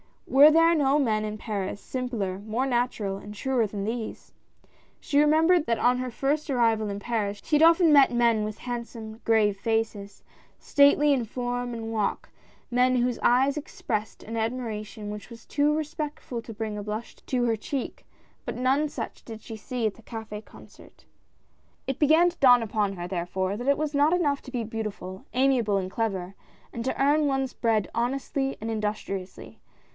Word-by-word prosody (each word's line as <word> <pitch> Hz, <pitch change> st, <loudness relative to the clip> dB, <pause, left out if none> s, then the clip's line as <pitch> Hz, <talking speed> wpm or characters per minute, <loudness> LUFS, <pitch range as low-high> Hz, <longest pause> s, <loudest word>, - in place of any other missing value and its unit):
Were 285 Hz, +3 st, +7 dB
there 330 Hz, +2 st, +5 dB
no 285 Hz, -3 st, +3 dB
men 220 Hz, -7 st, +1 dB
in 215 Hz, 0 st, -4 dB
Paris, 205 Hz, -3 st, -4 dB
simpler, 230 Hz, -8 st, -3 dB
more 220 Hz, +5 st, -2 dB
natural, 240 Hz, -6 st, -1 dB
and 210 Hz, +1 st, -10 dB
truer 245 Hz, 0 st, 0 dB
than 200 Hz, -1 st, -5 dB
these? 225 Hz, +1 st, -5 dB, 0.7 s
She 285 Hz, -, +1 dB
remembered 315 Hz, +3 st, +4 dB
that 230 Hz, -1 st, +1 dB
on 250 Hz, +1 st, +2 dB
hei 255 Hz, 0 st, -3 dB
first 290 Hz, +5 st, -1 dB
arrival 225 Hz, -5 st, +2 dB
in 200 Hz, 0 st, -4 dB
Paris 205 Hz, -2 st, -2 dB
she 300 Hz, -, +2 dB
had -, -, +1 dB
often 330 Hz, -1 st, +6 dB
met 280 Hz, -2 st, +7 dB
men 235 Hz, -3 st, +2 dB
with 215 Hz, 0 st, -5 dB
hand 240 Hz, -1 st, -4 dB
some, 220 Hz, -1 st, -9 dB
grave 215 Hz, -3 st, +3 dB
faces, 220 Hz, -2 st, -2 dB, 0.3 s
stately 285 Hz, 0 st, +4 dB
in 250 Hz, -4 st, 0 dB
form 245 Hz, +1 st, -3 dB
and 225 Hz, -1 st, -5 dB
walk 215 Hz, -3 st, -2 dB, 0.2 s
— -, -, -33 dB
men 250 Hz, +1 st, +3 dB
whose 245 Hz, -1 st, 0 dB
eyes 265 Hz, +4 st, +3 dB
expressed 215 Hz, -7 st, -4 dB
an 225 Hz, +1 st, -5 dB
admiration 220 Hz, -2 st, -4 dB
which 210 Hz, +1 st, -8 dB
was 230 Hz, -1 st, -12 dB
too 295 Hz, +1 st, +1 dB
respectful 300 Hz, -5 st, -4 dB
to 225 Hz, -, -8 dB
bring 215 Hz, -1 st, -4 dB
a -, -, -4 dB
blush 215 Hz, +3 st, -5 dB
to 250 Hz, -2 st, -2 dB
her 225 Hz, -2 st, +1 dB
cheek 265 Hz, +5 st, -5 dB, 0.2 s
— -, -, -37 dB
but -, -, -4 dB
none 270 Hz, +4 st, +1 dB
such 230 Hz, -5 st, -6 dB
did 220 Hz, -2 st, -9 dB
she 225 Hz, 0 st, -8 dB
see 240 Hz, +2 st, -3 dB
at 215 Hz, -, 0 dB
the -, -, -16 dB
Cafd 220 Hz, -2 st, -8 dB
Concert. -, -, -17 dB, 0.8 s
It 270 Hz, -, -3 dB
began 315 Hz, +4 st, +5 dB
to 345 Hz, -, -13 dB
dawn 245 Hz, -4 st, +6 dB
upon 210 Hz, -2 st, -1 dB
her, 175 Hz, -2 st, -6 dB
therefore, 185 Hz, +2 st, -2 dB
that 245 Hz, +3 st, -5 dB
it 280 Hz, -, +4 dB
was 305 Hz, -1 st, -2 dB
not 290 Hz, +3 st, +3 dB
enough 295 Hz, -6 st, +1 dB
to 260 Hz, -, -10 dB
be 245 Hz, -3 st, -2 dB
beautiful, 215 Hz, -4 st, -6 dB
amiable 250 Hz, -6 st, +2 dB
and 185 Hz, -1 st, -3 dB
clever, 195 Hz, -5 st, -2 dB, 0.4 s
and 235 Hz, -, -4 dB
to 260 Hz, -, -2 dB
earn 290 Hz, +2 st, +3 dB
ones' 270 Hz, -1 st, -1 dB
bread 220 Hz, -4 st, +1 dB
honestly 270 Hz, +3 st, -1 dB
and 225 Hz, +1 st, -3 dB
industriously. 210 Hz, -3 st, -4 dB
235 Hz, 185 wpm, -26 LUFS, 215-270 Hz, 0.8 s, Were